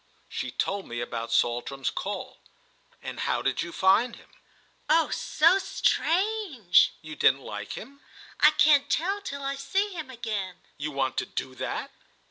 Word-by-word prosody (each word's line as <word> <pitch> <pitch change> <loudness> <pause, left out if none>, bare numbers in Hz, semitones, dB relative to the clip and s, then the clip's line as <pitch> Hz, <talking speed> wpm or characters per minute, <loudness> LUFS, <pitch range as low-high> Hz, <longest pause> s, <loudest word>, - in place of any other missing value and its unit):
She - - -4
told 200 0 -2
me 120 0 -5
about 115 -1 -4
Saltram's 120 +3 0
call. - - -5 0.6
"And - - -6
how - - 0
did - - 0
you 170 - -4
find 195 +8 +3
him?" - - -18 0.6
"Oh 325 -1 +4
so 335 +5 +3
strange!" 360 - +2
"You 155 -1 -8
didn't 135 -1 +4
like 105 -4 -6
him?" 275 +6 -9 0.4
"I 300 - +8
can't 290 -2 +4
tell 390 +6 0
till 280 -7 -6
I 275 0 -1
see 380 +10 0
him 320 -6 -6
again." 215 -7 -4 0.2
"You 150 +1 -2
want 135 -2 -1
to - - -1
do 130 - -4
that?" 130 - -4
230 Hz, 155 wpm, -27 LUFS, -, 0.6 s, I